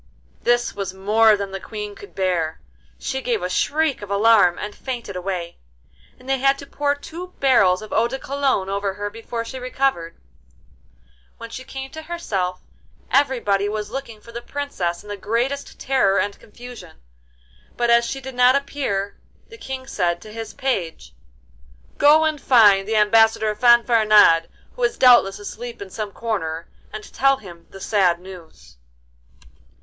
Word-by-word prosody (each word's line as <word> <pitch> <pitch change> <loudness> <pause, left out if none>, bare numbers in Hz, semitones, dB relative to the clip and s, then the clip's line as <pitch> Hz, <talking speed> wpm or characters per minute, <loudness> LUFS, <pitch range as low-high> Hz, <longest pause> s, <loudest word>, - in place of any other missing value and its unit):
This 240 0 +1
was 195 -2 -5
more 215 +2 +4
than 200 -1 -5
the 195 - -5
Queen 210 0 -7
could 200 - -14
bear. 175 -4 -1 0.4
She 265 0 -4
gave 230 -7 -1
a 180 - -2
shriek 305 +4 0
of 205 - -8
alarm 200 -3 +4
and 210 0 -5
fainted 240 -7 -6
away, 180 -2 -4 0.6
and 250 - -17
they 270 0 0
had 275 +1 +3
to 280 - -10
pour 285 0 -1
two 345 +5 -9
barrels 215 -8 +4
of 215 - -9
eau 225 +2 +3
de 265 +3 -4
cologne 270 -8 -1
over 200 0 -2
her 205 0 -4
before 230 +1 -6
she 260 +3 -7
recovered. 255 -9 -1 1.2
When 230 0 -9
she 260 - -7
came 270 0 -8
to 315 - -8
herself 200 - -3 0.5
everybody 225 -8 +2
was 210 0 -4
looking 235 -5 -7
for 235 - -14
the 235 +1 -6
Princess 220 -13 -4
in - - -15
the 205 - -4
greatest 240 +8 -2
terror 255 -8 +2
and 205 0 -1
confusion, 225 -7 -12 0.8
but 240 -1 +2
as 235 0 +5
she 270 +3 -4
did 265 0 -8
not 250 +1 +5
appear, 265 -8 -3 0.3
the 450 - -12
King 265 -5 -6
said 175 -8 -1
to 215 +2 -12
his 225 -1 -7
page: 170 - -3 0.9
'Go 300 +2 +6
and 310 -2 -1
find 205 -6 +5
the 220 - -1
Ambassador 220 0 +4
Fanfaronade, 215 -7 +5 0.3
who - - -9
is - - +1
doubtless 240 -6 +5
asleep 235 +3 -8
in 200 -2 -9
some 210 -1 -5
corner, 170 -8 -4 0.2
and 215 0 -9
tell 275 0 +3
him 175 -7 -13
the 195 - -12
sad 185 -4 +2
news. 175 - -14
220 Hz, 165 wpm, -21 LUFS, 195-260 Hz, 1.2 s, Go